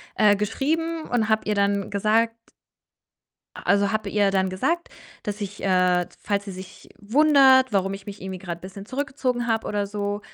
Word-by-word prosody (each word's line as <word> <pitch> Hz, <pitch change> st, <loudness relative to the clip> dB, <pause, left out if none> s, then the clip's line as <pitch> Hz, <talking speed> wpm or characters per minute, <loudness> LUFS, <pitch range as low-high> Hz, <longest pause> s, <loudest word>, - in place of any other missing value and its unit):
äh, 205 Hz, -1 st, +5 dB
geschrieben, 320 Hz, +10 st, -1 dB
und 225 Hz, -3 st, -1 dB
habe 220 Hz, 0 st, +2 dB
ihr 210 Hz, -, 0 dB
dann 200 Hz, 0 st, +1 dB
gesagt 220 Hz, +3 st, +1 dB, 1.2 s
a -, -, -9 dB
also, 200 Hz, 0 st, +2 dB
habe 215 Hz, -1 st, -2 dB
ihr 205 Hz, -1 st, +2 dB
dann 190 Hz, -1 st, +1 dB
gesagt, 295 Hz, -, -1 dB, 0.4 s
dass 210 Hz, +1 st, -4 dB
ich, 205 Hz, 0 st, -6 dB
äh 180 Hz, -2 st, +3 dB
falls 200 Hz, -1 st, -1 dB
sie 200 Hz, -, -7 dB
sich 185 Hz, 0 st, -11 dB
wundert, 265 Hz, +2 st, +5 dB
warum 195 Hz, -1 st, +1 dB
ich 195 Hz, 0 st, -10 dB
mich 200 Hz, -2 st, -9 dB
irgendwie 190 Hz, -1 st, -5 dB
grad 170 Hz, -2 st, -6 dB
bisschen 195 Hz, +2 st, -10 dB
zurückgezogen 255 Hz, -2 st, -2 dB
habe 225 Hz, -1 st, 0 dB
oder 205 Hz, -1 st, -1 dB
so, 205 Hz, 0 st, -3 dB
205 Hz, 175 wpm, -24 LUFS, 195-240 Hz, 1.2 s, äh